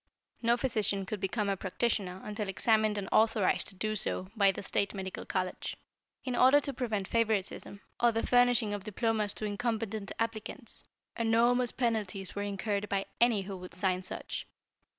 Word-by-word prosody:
No 235 0 +3
physician 215 -6 0
could 210 +1 -4
become 200 +2 -1
a 200 - +1
practitioner 190 -1 -1
until 210 0 -4
examined 215 +1 +2
and 195 -1 -3
authorized 215 -3 +3
to 195 - -4
do 215 +3 -1
so 185 -2 -2
by 200 -3 +5
the 195 - -7
State 200 +1 0
Medical 190 -1 -5
College. 185 -1 -2 0.5
In 255 -2 -2
order 260 +4 +7
to 280 -1 -4
prevent 220 -6 -2
favoritism, 210 -3 -1 0.2
or 240 0 +5
the 225 0 -1
furnishing 245 -3 +4
of 205 -2 -4
diplomas 215 0 0
to 215 - -4
incompetent 220 -1 -2
applicants, 230 +1 -3 0.3
enormous 235 +2 +3
penalties 210 -6 -1
were 205 - -3
incurred 205 +1 -2
by 195 -1 0
any 235 -4 +4
who 195 0 -6
would 180 -1 -8
sign 185 0 +1
such. 185 - -5
215 Hz, 165 wpm, -31 LUFS, 195-230 Hz, 0.5 s, order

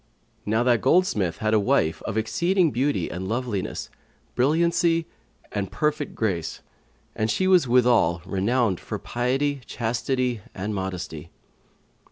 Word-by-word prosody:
Now 110 +3 +2
that 120 -3 +3
goldsmith 105 - +2
had 110 0 0
a 110 - +5
wife 105 - +1
of 110 - -2
exceeding 170 - +2
beauty 130 - 0
and 95 +1 -5
loveliness, 115 -3 -3 0.4
brilliancy 165 +4 +2 0.5
and 100 -2 -3
perfect 150 -1 -1
grace; 85 -7 -2 0.5
and 110 +1 0
she 185 - +1
was 180 -7 +5
withal 120 -9 +4
renowned 100 +1 +1
for - - -5
piety, 135 +3 -1
chastity 125 0 -1
and 100 +3 -3
modesty. 90 -5 -5
120 Hz, 125 wpm, -24 LUFS, 100-140 Hz, 0.5 s, a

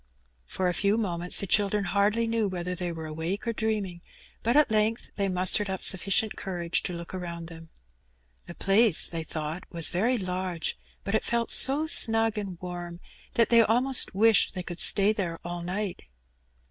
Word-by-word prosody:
For 185 - -2
a 180 - 0
few 200 +4 0
moments 175 -5 +1
the - - -2
children 205 +1 +1
hardly 205 +4 +1
knew 225 -2 -1
whether 180 -1 -4
Ihey 180 -1 -4
were 160 -1 -7
awake 160 +7 -5
or 230 - -1
dreaming; 210 -6 -3 0.4
but 235 +5 +1
at 300 -6 +4
length 220 +1 0
they 200 -1 -1
mustered 185 +3 0
up 190 -1 -4
sufficient 195 +3 +1
courage 175 -3 -3
to 180 - -5
look 170 +1 -8
around 170 -2 -6
them. 165 -1 -13 0.8
The 175 - -10
place 200 -1 +3
they 165 -1 -5
thought 155 +2 -6
was 165 -2 0
very 230 +8 0
large, 185 -3 -3 0.3
but 200 - -4
it 220 - +1
felt 235 -1 -1
so 285 +4 +6 0.2
mug 225 0 0
and 190 -4 -7
warm 175 -1 -7 0.4
that 230 -2 +3
they 235 -1 +6
almost 245 +1 +3
wished 220 +1 +3
they 180 - -4
could 175 -1 -8
stay 205 +1 +5
lihere 175 -6 -4
all 175 0 -5
night. 185 +2 -4
190 Hz, 180 wpm, -26 LUFS, 175-220 Hz, 0.8 s, so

